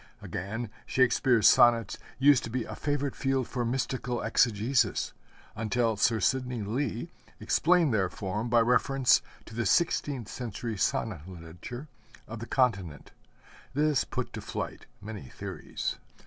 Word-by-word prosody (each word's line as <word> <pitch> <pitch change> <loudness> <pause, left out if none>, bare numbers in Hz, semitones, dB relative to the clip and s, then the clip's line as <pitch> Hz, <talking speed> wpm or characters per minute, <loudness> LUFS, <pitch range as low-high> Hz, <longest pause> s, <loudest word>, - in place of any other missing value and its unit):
Again, 105 +4 -5 0.2
Shakespeare's 125 -3 +4
sonnets 115 -4 +5 0.2
used 140 -1 +5
to - - -6
be 125 +1 -2
a - - -7
favorite 145 -1 -2
field 135 -2 0
for 125 -2 -2
mystical 125 0 -2
exegesis, 115 +1 +2 0.4
until 115 +1 0
Sir 110 +2 +2
Sidney 125 +1 0
Lee 120 +7 -2 0.3
explained 170 -5 +3
their 95 -4 +2
form 105 +6 -3
by 120 0 +5
reference 125 +3 +3 0.2
to - - -12
the 120 +1 -1
sixteenth 145 - +1
century 115 -1 -5
sonnet 95 -4 -1
literature 90 - -9 0.4
of 115 0 -7
the 120 - -7
continent. 95 - 0 0.6
This 150 -2 +2
put - - -4
to - - -5
flight - - -5 0.2
many 105 - -7
theories. - - -5
120 Hz, 135 wpm, -29 LUFS, 105-130 Hz, 0.6 s, sonnets